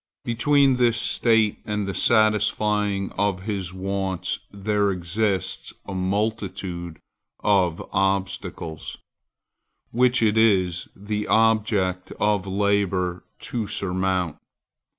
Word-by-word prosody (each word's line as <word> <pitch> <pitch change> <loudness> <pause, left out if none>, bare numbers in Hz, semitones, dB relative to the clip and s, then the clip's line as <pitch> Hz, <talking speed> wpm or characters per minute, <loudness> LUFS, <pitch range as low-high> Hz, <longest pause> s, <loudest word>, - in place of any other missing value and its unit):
Between 135 +3 +3
this 120 -2 +3
state 115 -2 +2
and 105 -1 -2
the 100 - -2
satisfying 105 -2 +2
of 100 -2 +1
his 95 -3 -3
wants, 95 -1 -3
there 100 0 0
exists 95 +1 -1
a 100 - -6
multitude 95 -3 -2 0.5
of 95 -5 +2
obstacles 95 -4 -2 0.9
which 125 0 +3
it 110 0 +3
is 95 -6 +2
the 105 +1 -4
object 105 -5 +2
of 105 -2 0
labor 95 -2 0 0.2
to 115 -4 -3
surmount. 95 -3 -1
100 Hz, 95 wpm, -24 LUFS, 95-110 Hz, 0.9 s, Between